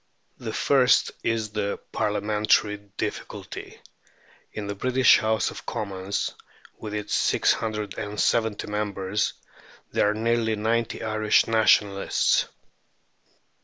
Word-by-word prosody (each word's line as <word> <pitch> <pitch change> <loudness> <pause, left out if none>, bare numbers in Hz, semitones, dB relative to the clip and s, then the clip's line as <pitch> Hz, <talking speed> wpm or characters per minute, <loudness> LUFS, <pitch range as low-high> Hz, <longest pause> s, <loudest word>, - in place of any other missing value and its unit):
The - - -5
first 135 -3 +3
is 110 -2 -1
the 105 -1 -2
Parliamentary 105 0 +1 0.2
difficulty. - - -6 0.7
In 105 - -5
the 100 - -3
British 130 +5 +4
House 110 0 0
of - - -9
Commons, 100 -1 -3 0.5
with 105 -1 -6
its 105 -1 -4
six - - +3
hundred 105 -3 -4
and 105 0 -5
seventy 110 -3 +1
members, 105 -1 -2 0.6
there 105 - +2
are 105 - -1
nearly 115 0 +1
ninety 115 +2 -1
Irish 110 -1 +2
Nationalists. 105 -3 +3
105 Hz, 110 wpm, -25 LUFS, 105-110 Hz, 0.7 s, British